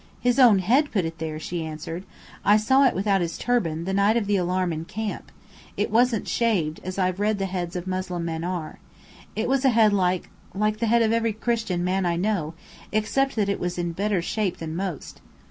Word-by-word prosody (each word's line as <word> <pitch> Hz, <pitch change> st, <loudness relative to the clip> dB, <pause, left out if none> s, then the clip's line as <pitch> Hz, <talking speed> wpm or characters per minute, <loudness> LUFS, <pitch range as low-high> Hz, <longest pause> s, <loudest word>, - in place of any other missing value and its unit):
"His 245 Hz, +2 st, +1 dB
own 240 Hz, -6 st, +7 dB
head 255 Hz, -, +2 dB
put 190 Hz, -6 st, 0 dB
it 165 Hz, -1 st, -6 dB
there," 155 Hz, -1 st, -4 dB
she 170 Hz, +1 st, -4 dB
answered. 160 Hz, +3 st, -6 dB, 0.4 s
"I 205 Hz, +2 st, +5 dB
saw 265 Hz, +6 st, +4 dB
it -, -, 0 dB
without 195 Hz, 0 st, +1 dB
his 165 Hz, -1 st, -3 dB
turban, 170 Hz, -10 st, 0 dB
the 190 Hz, -, -2 dB
night 200 Hz, +3 st, +3 dB
of 225 Hz, -, 0 dB
the 205 Hz, 0 st, +1 dB
alarm 180 Hz, -1 st, 0 dB
in 160 Hz, 0 st, -4 dB
camp. 215 Hz, +5 st, -5 dB, 0.5 s
It -, -, -1 dB
wasn't 235 Hz, -1 st, +2 dB
shaved, 185 Hz, -10 st, 0 dB
as 185 Hz, +1 st, -5 dB
I've 185 Hz, 0 st, 0 dB
read 210 Hz, 0 st, +1 dB
the 195 Hz, -, -1 dB
heads 180 Hz, -2 st, -4 dB
of 180 Hz, 0 st, -4 dB
Moslem 185 Hz, -2 st, -3 dB
men 165 Hz, -1 st, -3 dB
are. 175 Hz, -3 st, -4 dB, 0.6 s
It 220 Hz, -, -1 dB
was 270 Hz, +1 st, +1 dB
a 270 Hz, -, +5 dB
head 220 Hz, -3 st, +4 dB
like 185 Hz, -2 st, 0 dB, 0.2 s
like 215 Hz, +1 st, 0 dB
the 230 Hz, -, 0 dB
head 235 Hz, +1 st, +4 dB
of 220 Hz, -, +2 dB
every 230 Hz, -1 st, +1 dB
Christian 220 Hz, -5 st, -1 dB
man 185 Hz, 0 st, 0 dB
I 170 Hz, -, +1 dB
know, 175 Hz, -4 st, -1 dB, 0.4 s
except 270 Hz, +6 st, 0 dB
that 210 Hz, -3 st, +1 dB
it 200 Hz, -, -1 dB
was 180 Hz, 0 st, -3 dB
a 175 Hz, -, -1 dB
better 185 Hz, +2 st, -1 dB
shape 195 Hz, -2 st, -1 dB
than 160 Hz, -1 st, -5 dB
most! 185 Hz, -3 st, -5 dB
195 Hz, 215 wpm, -24 LUFS, 175-220 Hz, 0.6 s, own